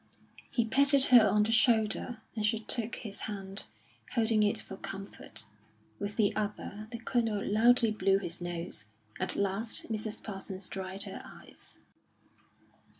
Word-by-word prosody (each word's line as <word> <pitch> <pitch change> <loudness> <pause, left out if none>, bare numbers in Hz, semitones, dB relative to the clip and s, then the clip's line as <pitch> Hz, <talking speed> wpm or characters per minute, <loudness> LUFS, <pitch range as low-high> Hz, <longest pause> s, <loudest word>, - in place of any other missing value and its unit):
He 235 - +1
patted 275 +3 +4
her 230 -3 +9
on 210 0 +4
the 220 - 0
shoulder, 225 0 +2
and 215 - -2
she 215 +1 +2
took 230 +1 0
his 205 -4 -6
hand, 195 - -6 0.5
holding 225 -2 +3
it 205 -1 +3
for 195 - -5
comfort. 195 0 -8 0.5
With 205 0 -3
the 210 -2 +2
other, 210 0 -4
the 235 - -4
Colonel 225 -3 0
loudly 230 +2 +4
blew 195 -2 +3
his 175 -2 -4
nose. 175 - -5 0.3
At - - 0
last 200 +4 0
Mrs 215 0 -4
Parsons 195 -2 -6
dried 190 +1 -4
her - - -6
eyes. - - -12
210 Hz, 145 wpm, -31 LUFS, 195-225 Hz, 0.5 s, her